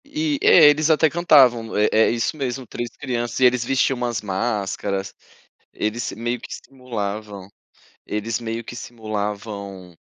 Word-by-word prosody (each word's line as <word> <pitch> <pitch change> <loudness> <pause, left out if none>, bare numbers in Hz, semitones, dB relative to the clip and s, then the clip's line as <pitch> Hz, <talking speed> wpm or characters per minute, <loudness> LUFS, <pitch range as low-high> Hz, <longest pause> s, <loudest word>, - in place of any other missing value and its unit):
E, 295 0 -2
é, 165 - +7
eles 155 +2 +2
até 160 0 +4
cantavam, 130 -9 +4
é 105 - +4
é 110 +1 +4
isso 120 +6 -1
mesmo, 130 -3 -4
3 120 +1 -5
crianças 120 -3 -3
e 130 - +5
eles 125 -1 +3
vestiam 135 +1 +1
umas 120 -2 -2
máscaras. 100 -1 -2 0.6
Eles 110 +3 -3
meio 120 +3 -3
que - - -10
simulavam 105 -6 -6 0.6
eles 105 +1 -2
meio 115 0 -4
que 120 - -9
simulavam, 100 -5 -6
115 Hz, 145 wpm, -22 LUFS, 105-130 Hz, 0.6 s, é